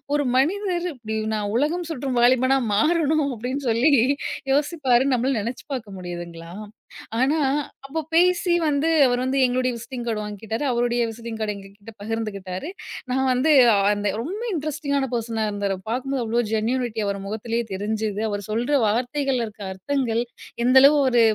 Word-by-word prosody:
ஒரு 290 -1 +1
மனிதர் 360 +4 +1
இப்படி, 220 -3 -5 0.2
"நான் 205 -1 -2
உலகம் 325 +6 0
சுற்றும் 265 -4 -2
வாலிபனா 260 +2 +4 0.2
மாறணும்." 310 +3 +2
அப்படி 245 +3 -4 0.2
சொல்லி 240 +7 +3 0.6
யோசிப்பாருனு 275 -3 +2
நம்மளால 250 0 0
நெனச்சுப்பார்க்க 235 -2 -6
முடியுதுங்களா? 175 -1 -7 0.7
ஆனா 280 +5 +2 0.5
அப்போ 285 +4 -3
பேசி 355 +1 +3
வந்து 290 +1 +1 0.2
அவர் 245 0 +1
வந்து 260 +1 0
எங்களுடைய 255 0 +1
விசிட்டிங் 240 +1 -7
கார்டு 225 -3 -2
வாங்கிக்கிட்டாரு. 215 +4 -5
அவருடைய 240 0 +1
விசிட்டிங் 230 0 -7
கார்ட 215 -1 -1
எங்க 195 -1 -10
கிட்ட 205 +2 -13
பகிர்ந்துக்கிட்டாரு. 205 - -4 0.4
நான் 265 +1 +1
வந்து 255 +5 +2 0.4
அந்த 205 0 -1
ரொம்ப 360 - -5
இன்ட்ரஸ்டிங்கான 290 -3 -1
பர்சனா 225 -1 -1
இருந்தாரு, 200 -1 -2
பார்க்கும்போது 260 +3 -2
அவ்ளோ 230 +2 0
ஜென்யூனிட்டி 230 +1 -1
அவரு 200 0 -2
முகத்திலயே 225 +3 -2
தெரிஞ்சுது. 210 +1 -2
அவரு 205 -1 -3
சொல்ற 245 +6 +1
வார்த்தைகள்ல 245 +3 0
இருக்க 215 -1 -13
அர்த்தங்கள், 235 +3 -1 0.4
எந்தளவு 265 +4 +7
ஒரு 240 -2 +4
245 Hz, 140 wpm, -23 LUFS, 220-275 Hz, 0.7 s, எந்தளவு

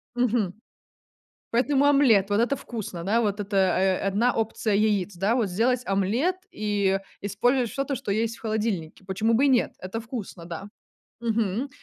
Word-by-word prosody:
Мгм. 235 -6 +1 1.0
Поэтому 275 +3 +3
омлет, 245 -9 +5
вот 205 +1 +2
это 250 +4 +2
вкусно, 205 -9 -6
да, 225 +5 +2
вот 205 -1 -1
это, 200 0 -4
э, 190 0 +3
1 225 +6 +2
опция 220 -1 -1
яиц, 205 -3 +1
да, 200 +7 +1
вот 230 -5 +1
сделать 240 +6 +1
омлет 215 - +1 0.2
и 200 -2 0 0.2
использовать 235 +5 +1
что-то, 275 0 -2
что 205 - -4
есть 225 +2 -1
в - - -19
холодильнике. 210 -6 -2
Почему 215 +4 0
бы 265 +5 +4
и - - +5
нет, 255 -3 +2
это 190 +5 -5
вкусно, 220 -7 -7
да. 175 +3 -6 0.6
Мгм. 225 +2 0
215 Hz, 160 wpm, -25 LUFS, 195-240 Hz, 1.0 s, омлет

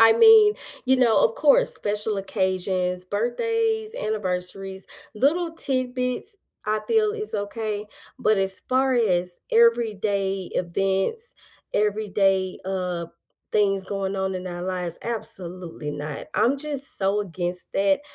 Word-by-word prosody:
I 225 0 +8
mean, 440 - +7 0.3
you 260 0 +3
know, 250 - +4
of 485 -1 +1
course, - - +5
special 210 +1 -1
occasions: 185 -2 -1
birthdays, 440 - -1
anniversaries, 190 - -3 0.3
little 325 +9 +1
tidbits, 255 - +1 0.3
I 215 0 0
feel 430 -2 +2
is 430 -1 -3
okay, 210 0 -3 0.3
but 215 -2 +2
as 190 -1 +4
far 260 +1 +2
as 180 -7 +1
everyday 210 - +1
events, 195 - 0 0.4
everyday, 200 -3 0
uh, 180 -3 -3 0.5
things 195 -2 +2
going 195 0 -3
on 190 0 -2
in 185 0 -5
our 175 -1 -5
lives, 180 -2 -3
absolutely 180 -8 -2
not. 145 0 -6
I'm 260 +4 +2
just 280 -1 +2
so 200 +1 +1
against 180 -2 -2
that, 195 +2 +2
205 Hz, 120 wpm, -23 LUFS, 185-255 Hz, 0.5 s, I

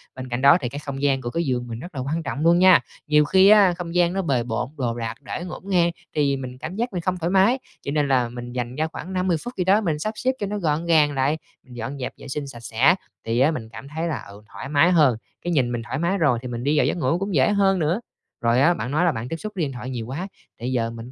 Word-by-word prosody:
Bên 130 -1 -7
cạnh 120 +1 -2
đó 140 +1 +7
thì 125 - -2
cái 145 - -6
không 140 -2 -6
gian 135 -2 +2
của 120 - -4
cái 170 +7 -1
giường 125 -3 -1
mình 115 -1 -6
rất 175 +4 -10
là 130 - -2
quan 155 +5 -2
trọng 140 -1 -4
luôn 170 +1 +5
nha. 185 -1 +7 0.3
Nhiều 150 0 +4
khi 190 +5 +5
á 205 -4 +7
không 170 -1 -6
gian 175 0 +3
nó 195 - 0
bề 135 -9 0
bộn, 115 +1 -3
đồ 120 -4 -1
đạc 115 -1 -3
để 140 - -5
ngổn 180 - -7
ngang 175 -3 +3 0.2
thì 140 -2 +2
mình 130 -1 -7
cảm 160 +6 -6
giác 235 +1 -2
mình 180 - -2
không 180 +2 -1
thoải 170 0 -2
mái, 195 +8 +4 0.2
cho 140 - -3
nên 145 -1 +1
là 125 -3 +2
mình 120 0 -7
dành 125 0 -3
ra 155 +2 0
khoảng 180 +3 -8
5-10 185 -2 +1
phút 245 - -6
gì 185 - +1
đó 195 +4 +4
mình 160 -7 -1
sắp 215 +7 -2
xếp 255 - +1
cho 205 - -2
nó 210 +1 -3
gọn 160 -3 0
gàng 155 -3 +4
lại, 140 +3 +1 0.3
mình 125 -1 -13
dọn 120 +5 -5
dẹp 125 - -4
vệ - - -11
sinh 140 +1 -4
sạch 130 -4 -9
sẽ 120 +8 +3 0.3
thì 115 +1 0
á 140 +5 +4
mình 115 -8 -5
cảm 115 +4 -10
thấy 160 +3 -3
là, 160 - -3
ừ, 100 +1 -12
thoải 135 - -7
mái 150 +5 +4
hơn, 150 -9 +4 0.2
cái 175 - -2
nhìn 130 -6 +2
mình 120 -1 -2
thoải 120 +2 -4
mái 175 +4 +1
rồi 145 -9 +2
thì 125 - -6
mình 120 -1 -5
đi 145 +3 +2
vào - - +4
giấc - - 0
ngủ 155 0 +1
cũng 195 -1 -2
dễ 130 -2 +4
hơn 195 -2 +3
nữa. 165 +5 +1 0.4
Rồi 120 +2 +3
á 170 +5 +5
bạn 125 -5 -4
nói 155 +5 +2
là 170 - +4
bạn 115 -3 -5
tiếp - - -2
xúc 215 +6 -6
với 180 - -1
điện 140 - -2
thoại 125 0 -6
nhiều 120 -3 -4
quá, 150 +9 -4 0.3
thì 120 - -6
bây 125 - -1
giờ 115 -3 0
mình 115 +2 -9
145 Hz, 305 wpm, -23 LUFS, 125-175 Hz, 0.4 s, đó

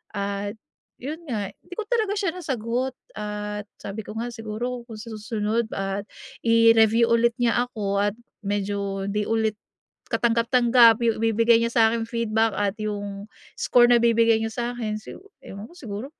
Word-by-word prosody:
At 200 +1 -3 0.5
'yun 310 +4 -4
nga. 205 -5 -3
Hindi 360 - -14
ko 445 - -3
talaga 440 -4 +1
siya 390 -4 0
nasagot 255 -6 -3 0.2
at 210 0 -4
sabi 205 +1 -7
ko 215 - -7
nga 240 +2 -3
siguro 235 +2 -5
kung 225 - -9
sa 225 +2 -9
susunod 220 +1 -2
at 195 +1 -3 0.4
i-review 230 0 +5
ulit 235 0 +3
niya 245 -1 +2
ako 200 -4 -2
at 205 +1 +1 0.2
medyo 200 -1 -2
'di 210 0 -1
ulit 220 -1 0 0.6
katanggap-tanggap 235 0 +4
yung 230 -1 +2
ibibigay 225 +1 +4
niya 230 0 -1
sa 230 - +4
akin 230 -1 -1
feedback 225 -1 0
at 205 0 0
yung 205 -1 -4 0.3
score 240 0 +4
na 240 - +7
bibigay 230 -1 +4
niya 225 0 -2
sa 240 - -3
akin 215 -3 -2
si - - -10 0.2
ewan 200 +2 -9
ko 305 - -16
siguro, 230 - -6
225 Hz, 165 wpm, -24 LUFS, 210-235 Hz, 0.6 s, na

